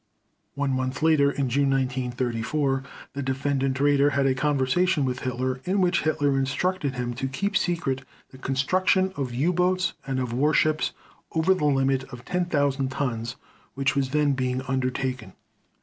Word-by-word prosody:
One 140 -1 0
month 130 +2 -2
later, 155 -3 +5
in 140 -1 -1
June 140 +3 +2
1934, 130 +1 0 0.3
the 140 - -4
Defendant 135 0 -1
Raeder 145 0 +3
had 140 0 +2
a 135 - +3
conversation 145 +4 +1
with 130 0 -2
Hitler 130 0 -2
in 190 +2 0
which 180 -1 +2
Hitler 145 -3 +1
instructed 140 +2 -1
him 120 -1 -2
to 135 +2 -3
keep 200 +10 -2
secret 165 -9 0 0.3
the 130 - -13
construction 185 +8 +1
of 135 -3 -3
U 145 +9 +1
boats 185 +1 +1
and 135 -1 -1
of 125 -2 -2
warships 150 +3 +2 0.4
over 165 +4 +3
the 170 -5 -1
limit 135 -2 +2
of 125 -2 -11
10,000 145 -7 0
tons 120 -3 -3 0.4
which 135 0 +1
was 135 -2 +1
then 150 0 +2
being 130 0 -1
undertaken. 130 -4 -2
135 Hz, 155 wpm, -25 LUFS, 130-150 Hz, 0.4 s, later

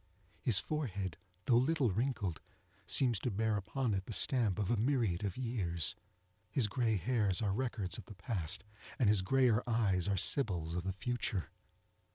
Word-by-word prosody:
His 115 -7 +2
forehead, 100 - -2 0.3
although 120 -1 +5
little 140 -6 +2
wrinkled, 105 - -1 0.5
seems 120 -6 +2
to 125 - -1
bear 110 +1 0
upon 110 +4 -1
it 95 -1 -2
the 115 - -5
stamp 115 -5 +2
of 105 0 0
a - - +3
myriad 115 -6 +1
of 100 -3 -3
years. 95 - -1 0.6
His 125 -7 +1
gray 110 +1 +1
hairs 105 -3 +1
are 105 -4 0
records 105 - -2
of - - -10
the 105 - -11
past, 90 -4 -2 0.3
and 120 - +3
his 105 -2 +4
grayer 120 +2 +3
eyes 100 -6 +2
are 100 -1 +1
sibyls 90 - +1
of 90 +1 -3
the 95 - -1
future. 115 - -2
105 Hz, 170 wpm, -34 LUFS, 95-125 Hz, 0.6 s, although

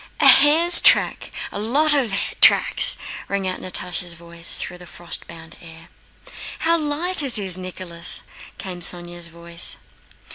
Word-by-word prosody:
"A 290 - +4
hare's 295 +6 +6
track, - - +3 0.2
a - - -7
lot 285 +8 +1
of 265 -7 -1 0.3
tracks!" - - +4 0.3
rang 200 -1 -3
out 185 - -5
Natásha's 180 -1 -5
voice 170 0 -4
through 180 - -7
the 180 - -13
frost 175 0 -7
bound 165 0 -13
air. 165 0 -13 0.7
"How 330 +1 +1
light 320 +3 0
it 270 -5 +4
is, 190 -4 0
Nicholas!" 185 -2 -3 0.3
came 185 -2 -8
Sónya's 175 0 -3
voice. 170 0 -4
185 Hz, 140 wpm, -19 LUFS, 170-275 Hz, 0.7 s, hare's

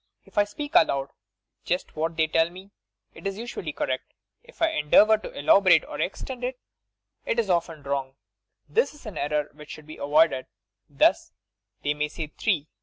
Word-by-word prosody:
If - - -2
I 205 - +5
speak 290 +8 -7
aloud 140 0 +3 0.5
just 180 +1 -2
what 160 +1 -2
they 160 - +4
tell 165 +1 +2
me, 190 +3 -13 0.4
it - - -6
is 195 0 -4
usually 220 -8 -5
correct. 130 -2 -3 0.3
If - - -19
I 330 - +3
endeavour 210 - +5
to - - -7
elaborate 175 +2 +5
or - - -5
extend 250 +6 -4
it, 250 +1 -2 0.7
it - - -1
is 220 -5 +1
often 165 -3 -1
wrong. 135 -1 -3 0.5
This 460 -8 +1
is 295 - -17
an 215 - -7
error 150 0 -1
which 150 +1 -13
should 155 - -9
be 155 - -10
avoided. 145 -1 +3 0.4
Thus: - - +2 0.5
they 145 - +1
may 150 0 -1
say 155 +1 -5
'three.' 170 -9 0
165 Hz, 180 wpm, -26 LUFS, 150-210 Hz, 0.7 s, I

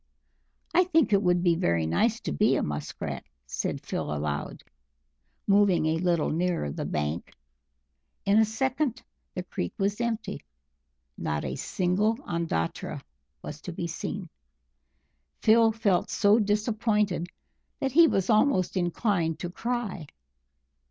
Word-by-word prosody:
"I 365 +1 +5
think 325 - +3
it 200 - +5
would 175 -2 +2
be 175 -2 +4
very 85 - +1
nice 225 - +1
to - - -3
be 75 - +3
a - - 0
Musk 75 0 -5
Rat," - - -4 0.2
said - - -3
Phil - - -3
aloud, 75 -1 -3 0.8
moving 200 -4 +4
a 160 +1 +1
little 170 -3 +1
nearer 170 - 0
the - - -4
bank. 75 +2 -3 0.9
In 200 +2 +5
a - - +7
second 255 +3 -1 0.3
the 180 - -3
creek 90 - -4
was 200 +3 0
empty 230 -2 -2 0.8
not 75 -1 -2
a 65 0 -3
single 190 - 0
Ondatra 165 - -2 0.4
was 155 +1 -7
to 180 - -6
be 170 0 -4
seen. 185 +3 -4 1.2
Phil 225 0 +6
felt 205 -5 +1
so 205 +2 +4
disappointed 210 -3 +1 0.5
that 270 - -1
he 330 +5 +7
was 195 - +1
almost 215 -5 +3
inclined 175 -2 0
to 175 - -5
cry. 225 -7 -3
190 Hz, 135 wpm, -27 LUFS, 165-220 Hz, 1.2 s, a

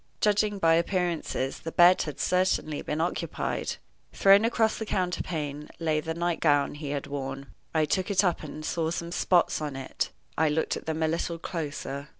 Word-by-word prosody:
Judging 210 0 +2
by 165 -4 +4
appearances, 170 -6 0
the 165 - -6
bed 175 +2 +6
had 150 -3 -5
certainly 180 -5 +1
been 150 - -3
occupied. 170 +2 -2 0.4
Thrown 200 +2 +6
across 225 -1 +1
the 220 - -3
counterpane 155 -6 -2
lay 160 -2 +1
the 160 +1 -4
nightgown 165 -4 +2
he 145 -1 -6
had 140 -1 -2
worn. 135 -1 -5 0.2
I 160 -1 +2
took 185 +5 0
it 200 -1 +3
up 180 -3 +1
and 155 0 -7
saw 160 -1 -1
some 170 0 -4
spots 175 -2 +2
on 145 -3 -3
it. 135 0 -3 0.3
I 160 0 +3
looked 160 +2 0
at - - -8
them 160 0 -1
a - - +3
little 170 +1 -2
closer. 150 -4 -5
165 Hz, 175 wpm, -27 LUFS, 150-180 Hz, 0.4 s, bed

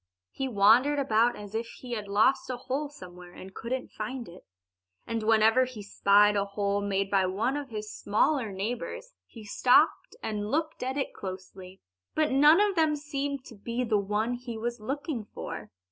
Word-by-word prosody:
He 270 - -3
wandered 250 +6 +4
about 240 -3 +2
as 205 0 -10
if 230 +1 -2
he 245 +1 -11
had 215 -4 -3
lost 220 +8 +2
a 255 - -2
hole 270 +4 -3
somewhere 180 -9 -12
and 190 +1 -11
couldn't 250 +5 -4
find 235 +3 -5
it. 175 +2 -14 0.6
And 230 -1 -2
whenever 225 +3 +4
he 245 -5 -9
spied 205 +1 +4
a 200 - +2
hole 200 0 -1
made 195 -1 -1
by 190 -2 +3
one 220 +9 -1
of 290 -2 -4
his 215 -1 -6
smaller 225 +2 +1
neighbors 245 - -5
he 225 - -12
stopped 255 - +3
and 210 -1 -3
looked 315 +4 -1
at 260 +2 -2
it 275 - -2
closely. 185 0 -9 0.3
But 310 -1 +2
none 295 +5 +6
of 410 -2 +2
them 315 -2 +3
seemed 285 -2 -4
to 230 - -12
be 235 +4 -3
the 220 -3 +2
one 210 +4 -1
he 240 -2 -6
was 235 +1 -3
looking 270 +1 -4
for. - - -6
230 Hz, 180 wpm, -28 LUFS, 205-270 Hz, 0.6 s, none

